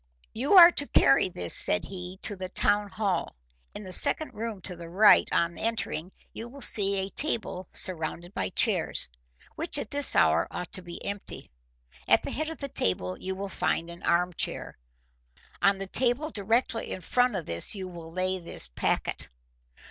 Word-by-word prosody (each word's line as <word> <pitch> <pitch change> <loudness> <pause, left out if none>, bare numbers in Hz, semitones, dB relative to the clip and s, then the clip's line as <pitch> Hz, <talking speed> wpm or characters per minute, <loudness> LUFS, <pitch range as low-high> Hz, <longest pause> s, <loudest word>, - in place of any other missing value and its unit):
"You 265 - -1
are 350 -2 +10
to 285 -4 -1
carry 135 +7 +4
this," 90 - -1
said 90 - +3
he, 185 -1 -5
"to 205 - 0
the 185 -1 -6
town 205 +2 +1
hall. 195 -4 -2 0.4
In - - -7
the 185 -1 -8
second 310 - +3
room 225 -2 -5
to 180 0 -4
the 170 -1 -10
right 205 +5 +5
on 170 0 0
entering 215 -6 -3 0.2
you 230 +2 -7
will 280 +3 -12
see 200 -6 +4
a 190 0 -2
table 205 - -1
surrounded 175 0 0
by 95 - -2
chairs, - - 0 0.5
which 330 -1 -2
at 285 - -5
this 285 -1 +1
hour - - +3
ought 180 - -7
to 185 - -5
be 175 -1 -9
empty. 200 0 -5 0.6
At - - +4
the - - -5
head 310 +1 -3
of 325 - -7
the 280 - -5
table 90 - -1
you 190 0 -4
will 200 +1 -5
find 170 -2 -2
an 170 - -11
arm 180 +1 +1
chair. - - -3 0.9
On 195 +2 +3
the 195 - -5
table 250 +9 +2
directly 225 +2 -1
in 185 - -5
front 245 +5 +1
of 175 -4 -4
this 85 - -1
you 190 -2 -6
will 170 -2 -10
lay 185 +1 -2
this 170 - -1
packet. - - -2
190 Hz, 185 wpm, -27 LUFS, 175-230 Hz, 0.9 s, are